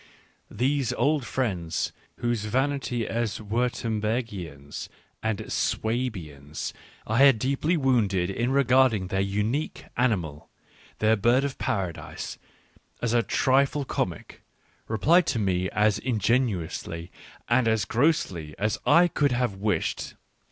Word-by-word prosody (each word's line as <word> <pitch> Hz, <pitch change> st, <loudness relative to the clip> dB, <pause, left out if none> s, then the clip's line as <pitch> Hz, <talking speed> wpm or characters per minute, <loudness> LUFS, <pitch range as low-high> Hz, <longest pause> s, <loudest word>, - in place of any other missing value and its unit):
These 130 Hz, +2 st, 0 dB
old 145 Hz, -1 st, +1 dB
friends, 90 Hz, -12 st, -1 dB, 0.2 s
whose 120 Hz, -3 st, -1 dB
vanity 130 Hz, 0 st, 0 dB
as 115 Hz, -2 st, -1 dB
Wiirtembergians 110 Hz, -, -3 dB, 0.3 s
and 110 Hz, -2 st, -2 dB
Swabians 90 Hz, -, -2 dB, 0.3 s
I 110 Hz, +3 st, 0 dB
had 135 Hz, -3 st, +7 dB
deeply 140 Hz, +8 st, 0 dB
wounded 105 Hz, -, +2 dB
in 120 Hz, +6 st, -1 dB
regarding 130 Hz, -7 st, +3 dB
their 95 Hz, -1 st, 0 dB
unique 105 Hz, +9 st, -1 dB
animal, 90 Hz, -, -1 dB, 0.5 s
their 110 Hz, +1 st, +3 dB
bird 120 Hz, +5 st, +3 dB
of 140 Hz, -1 st, -3 dB
Paradise, 95 Hz, -6 st, -3 dB, 0.6 s
as 120 Hz, -1 st, -1 dB
a 120 Hz, -, +4 dB
trifle 135 Hz, +4 st, +2 dB
comic, 90 Hz, -9 st, -4 dB, 0.5 s
replied 160 Hz, -, +3 dB
to 135 Hz, -, 0 dB
me 95 Hz, -3 st, 0 dB
as 105 Hz, -1 st, +2 dB
ingenuously 105 Hz, -8 st, -1 dB, 0.4 s
and 120 Hz, 0 st, +3 dB
as 110 Hz, -2 st, +2 dB
grossly 100 Hz, -, 0 dB
as 105 Hz, +2 st, 0 dB
I 175 Hz, +1 st, +6 dB
could 145 Hz, -5 st, +1 dB
have 120 Hz, -3 st, 0 dB
wished. 105 Hz, +1 st, -1 dB
115 Hz, 115 wpm, -26 LUFS, 100-130 Hz, 0.6 s, had